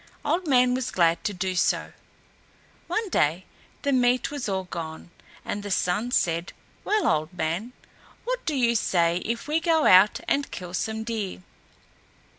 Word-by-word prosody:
Old 330 +4 0
Man 250 -2 +4
was 255 0 -2
glad 170 -6 +2
to - - +1
do 185 -1 -2
so. 180 - 0 0.9
One 440 -1 -1
day 170 - +1 0.4
the 280 - +1
meat 250 0 +2
was 285 -7 -4
all 190 -1 -1
gone, 165 -2 -7 0.3
and 205 - -3
the 205 - -6
Sun 190 +4 0
said, 170 -6 0 0.3
"Well, 425 0 +1
Old 155 +2 +1
Man, 180 +8 -3 0.5
what - - -3
do 305 - 0
you 240 -3 +3
say 170 -5 +2
if 230 +3 -3
we 305 +2 +1
go 325 -2 +2
out 185 +3 +6
and 280 0 0
kill 180 -1 -8
some 220 +3 -2
deer?" 215 -5 -4
215 Hz, 160 wpm, -25 LUFS, 180-260 Hz, 0.9 s, out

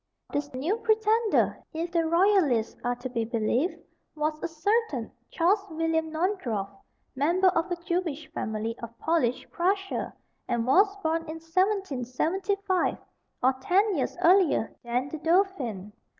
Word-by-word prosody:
This 285 0 -2
new 320 - 0
pretender, 440 0 +2
if 335 +2 -3
the 335 -1 +1
royalists 335 - +3
are 245 0 0
to 245 +1 -6
be 235 -2 -2
believed, 235 - 0 0.4
was 305 0 -2
a - - -1
certain 325 - 0 0.2
Charles 390 +5 +2
William 320 0 0
Naundorff, 315 - -1 0.4
member 345 +8 +3
of 345 0 0
a 350 - 0
Jewish 340 -4 -2
family 220 -5 -3
of 235 0 -8
Polish 315 -7 0
Prussia, 390 +3 -1 0.4
and 235 -2 0
was 395 +10 +4
born 320 +1 +1
in 315 - -4
1775, 370 - 0 0.5
or 260 +1 +5
ten 390 +6 +3
years 280 - -2
earlier 355 - +4
than 245 +2 -1
the 315 - -6
dauphin. 295 - 0
325 Hz, 135 wpm, -27 LUFS, 255-380 Hz, 0.5 s, or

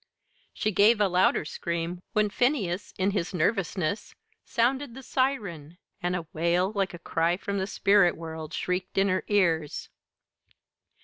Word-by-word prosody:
She 215 - -1
gave 210 +3 +5
a 205 - +4
louder 180 -3 +2
scream 170 +3 -3
when 210 -1 +2
Phineas, 210 - 0
in 195 +1 +1
his 185 -2 -2
nervousness, 185 0 -1 0.3
sounded 250 +2 0
the 265 - -9
siren, 200 - -2 0.2
and 180 0 0
a 170 -2 -3
wail 170 +4 +1
like 195 -4 -1
a - - -7
cry 170 +1 0
from 200 0 -3
the 190 - -1
spirit 195 -3 +3
world 160 -1 -7
shrieked 180 +2 -3
in 195 +1 +4
her 185 0 0
ears. 165 -7 +1
185 Hz, 145 wpm, -27 LUFS, 170-205 Hz, 0.3 s, gave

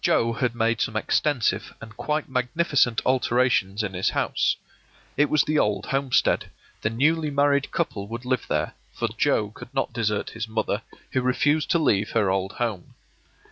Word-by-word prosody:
Joe 115 0 +2
had 120 -1 -1
made 115 -1 +1
some 110 - -1
extensive 110 -3 0
and 110 -1 -11
quite 150 +5 -2
magnificent 125 -1 +1
alterations 120 -5 +2
in 100 -3 -3
his 90 +1 +1
house. - - +1 0.6
It 145 0 +3
was 155 - +4
the 155 0 +1
old 105 -1 +1
homestead; 135 -2 +1 0.3
the 105 - +1
newly 150 +7 +1
married 140 0 +2
couple 100 -12 -2
would 115 +3 -6
live 125 -2 -1
there, - - -1 0.2
for - - -2
Joe 105 -1 +1
could 115 - -12
not 135 - -1
desert 105 -3 -1
his 110 0 -5
mother, 110 -1 -1 0.3
who 130 - +1
refused 145 +4 +1
to - - +4
leave 110 -10 +1
her 105 -4 +2
old 95 0 -1
home. 110 -7 -4
120 Hz, 170 wpm, -25 LUFS, 110-140 Hz, 0.6 s, was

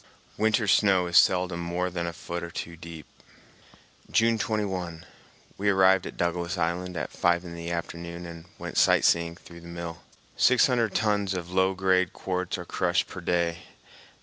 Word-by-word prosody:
Winter 110 0 +2
snow 95 -1 +4
is 85 -1 -4
seldom 90 0 +4
more 90 +1 -2
than 85 -1 -3
a - - -2
foot 85 +1 -6
or 85 - -6
two 85 0 -6
deep. 80 -3 -10 1.0
June 115 0 +3
21. 95 -7 -3 0.5
We 100 +1 +2
arrived 95 -1 +4
at - - -9
Douglas 85 +1 -1
Island 85 +1 -2
at 75 - -4
five 85 0 +1
in 85 - -8
the 85 0 -6
afternoon 85 0 -5
and 85 -1 -9
went - - -2
sight - - +4
seeing 85 0 +2
through 85 -1 -14
the 85 - -12
mill. 85 -1 -7 0.3
Six 130 -1 +5
hundred 120 -5 +1
tons 105 -3 +1
of 90 -1 -5
low 95 +1 +2
grade 95 -2 +2
quartz 90 -1 -3
are 90 - -7
crushed 90 +1 0
per 90 - -9
day. 85 -1 0
90 Hz, 175 wpm, -27 LUFS, 85-95 Hz, 1.0 s, Six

